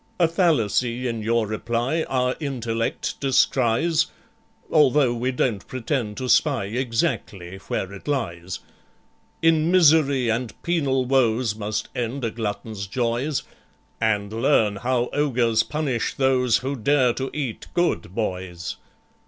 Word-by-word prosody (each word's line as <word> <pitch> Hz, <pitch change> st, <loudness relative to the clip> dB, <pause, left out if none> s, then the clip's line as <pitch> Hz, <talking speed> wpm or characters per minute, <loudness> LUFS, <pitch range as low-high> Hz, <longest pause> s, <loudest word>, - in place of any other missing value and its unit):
"A 170 Hz, -, +5 dB
fallacy 125 Hz, -, +1 dB
in 115 Hz, -2 st, -3 dB
your 115 Hz, +1 st, +1 dB
reply 120 Hz, +8 st, -1 dB
Our 125 Hz, -1 st, +1 dB
intellect 115 Hz, -6 st, -3 dB
descries, 135 Hz, +3 st, +2 dB, 0.6 s
Although 145 Hz, -4 st, +4 dB
we 120 Hz, +2 st, -1 dB
don't 120 Hz, -5 st, -1 dB
pretend 125 Hz, -4 st, -3 dB
to 130 Hz, -, -3 dB
spy 135 Hz, -4 st, +3 dB
Exactly 105 Hz, -5 st, -2 dB
where 95 Hz, +1 st, -3 dB
it 100 Hz, -, -11 dB
lies. 90 Hz, -11 st, -3 dB, 0.8 s
"In 165 Hz, 0 st, +4 dB
misery 150 Hz, -7 st, +4 dB
and 115 Hz, 0 st, -2 dB
penal 140 Hz, -7 st, +1 dB
woes 125 Hz, -3 st, +2 dB
Must 105 Hz, -1 st, -3 dB
end 125 Hz, +2 st, -2 dB
a 115 Hz, -, -1 dB
glutton's 105 Hz, -2 st, -4 dB
joys; 120 Hz, +6 st, -1 dB, 0.6 s
And 105 Hz, -2 st, 0 dB
learn 110 Hz, -4 st, +2 dB
how 125 Hz, +2 st, 0 dB
ogres 125 Hz, -6 st, +2 dB
punish 140 Hz, -5 st, -2 dB
those 130 Hz, -3 st, +3 dB
Who 135 Hz, +2 st, -3 dB
dare 130 Hz, 0 st, +2 dB
to 135 Hz, +2 st, -3 dB
eat 135 Hz, -7 st, -4 dB
good 175 Hz, -, 0 dB
boys. 90 Hz, -6 st, -4 dB
125 Hz, 125 wpm, -23 LUFS, 110-140 Hz, 0.8 s, A